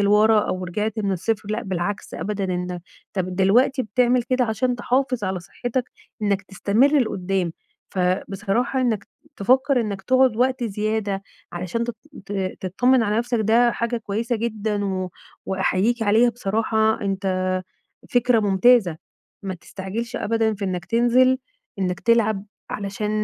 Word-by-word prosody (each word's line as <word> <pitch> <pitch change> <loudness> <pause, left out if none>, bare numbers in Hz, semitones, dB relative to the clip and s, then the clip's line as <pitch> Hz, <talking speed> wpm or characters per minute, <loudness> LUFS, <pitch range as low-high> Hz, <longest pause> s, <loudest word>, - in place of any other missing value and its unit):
لورا 210 +2 +5
أو 185 -3 -2
رجعت 210 +5 -2
من 200 -2 0
الصفر 205 +3 -2
لأ، 225 +2 -2
بالعكس 190 +1 -3
أبدًا 205 -1 -3
إن 180 -1 -3 0.3
طَب 185 -2 -2
دلوقتي 245 +8 +3
بتعمل 245 +3 +2
كده 255 +1 +1
عشان 245 +3 0
تحافظ 250 -2 0
على 185 -1 -2
صحّتك 245 +7 -3 0.4
إنّك 200 -1 +1
تستمر 225 +9 +2
لقُدّام، 190 -6 -1 0.4
فبصراحة 195 +7 0
إنّك 225 -5 0 0.3
تفكّر 260 +5 +3
إنّك 200 -3 -3
تقعُد 255 -1 +3
وقت 255 0 +1
زيادة 210 -2 -1 0.3
علشان 180 +6 -2
تط 235 -1 -5 0.3
ت - - -6 0.3
تتطمن 245 +7 +3
على 210 +2 +1
نَفْسك 240 -1 0
ده 235 +3 +4
حاجة 235 +1 -1
كويسة 225 +2 -2
جدًا 215 -2 -2
و 185 -2 -2 0.4
وأحييك 190 +5 +1
عليها 225 +3 +4
بصراحة 220 0 +1
أنت 185 -2 -1 0.5
فكرة 245 -1 +3
ممتازة، 200 -2 +4 0.5
ما 190 -1 -3
تستعجلش 200 +7 -6
أبدًا 225 0 +1
في 200 - -5
إنّك 180 -2 -3
تنزِل 245 +5 +3 0.4
إنّك 180 0 -1
تلعب 220 -4 +2 0.3
علشان 205 +1 -3
215 Hz, 135 wpm, -23 LUFS, 195-240 Hz, 0.5 s, لورا